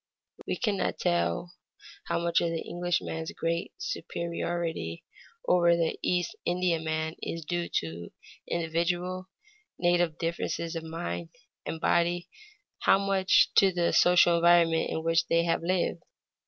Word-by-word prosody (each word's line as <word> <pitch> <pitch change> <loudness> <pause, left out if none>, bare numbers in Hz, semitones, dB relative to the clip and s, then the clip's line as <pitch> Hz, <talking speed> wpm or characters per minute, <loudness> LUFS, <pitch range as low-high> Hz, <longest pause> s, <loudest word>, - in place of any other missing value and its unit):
We - - 0
cannot 210 -5 -1
tell 85 - 0 0.5
how 170 - -1
much 170 0 +1
of 170 - +1
the 165 0 -3
Englishman's 175 -2 -2
great 170 +1 -2
superiority 170 - -4 0.4
over 170 -1 +4
the 165 -1 -1
East 175 -1 0
Indiaman 160 -3 -1
is 165 -2 -5
due 175 +1 -2
to 85 +1 -7 0.4
individual, 175 +3 -1 0.5
native 175 -2 +2
differences 165 0 -3
of 165 - -3
mind 85 - -5 0.4
and 165 - -4
body, 175 +1 +1 0.5
how - - +5
much 195 -1 +3
to 195 -1 +6
the 175 -1 0
social 175 -1 +5
environment 170 -1 +4
in 160 - -3
which 165 0 +2
they 170 0 +3
have 170 - 0
lived. 175 0 0
170 Hz, 130 wpm, -28 LUFS, 165-175 Hz, 0.5 s, to